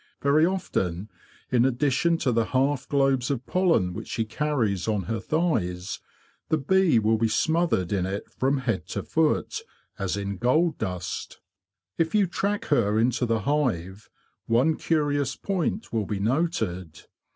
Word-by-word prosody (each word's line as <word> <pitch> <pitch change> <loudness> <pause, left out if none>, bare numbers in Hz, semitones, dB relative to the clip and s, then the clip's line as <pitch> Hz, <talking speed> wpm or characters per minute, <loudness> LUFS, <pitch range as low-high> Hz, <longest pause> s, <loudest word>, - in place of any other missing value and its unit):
Very 150 +4 +4
often, 100 - -2 0.4
in 120 -2 +4
addition 135 +6 +2
to 135 -5 0
the 115 -1 +2
half 135 +1 0
globes 135 -3 +2
of 130 -3 -2
pollen 165 - +2
which 110 +4 -7
she 115 - -2
carries 110 - -1
on 105 -3 0
her 110 +6 -3
thighs, 100 - -1 0.5
the 160 - +3
bee 175 0 +3
will 110 0 +2
be 115 - +3
smothered 155 - +1
in 95 -2 0
it 100 +1 -4
from 135 +2 0
head 105 -10 -2
to - - -4
foot, - - 0 0.4
as 95 0 -1
in 100 -1 -3
gold 155 - +2
dust. 90 -1 -4 0.6
If 165 +4 +1
you 205 -2 +5
track 200 +3 -2
her 105 -2 +2
into 125 +2 +1
the 115 -1 +1
hive, 105 - -1 0.4
one 130 +8 +3
curious 145 -3 0
point 195 - -2
will 110 -4 0
be 105 -2 -2
noted. 110 - -1
125 Hz, 150 wpm, -26 LUFS, 100-155 Hz, 0.6 s, you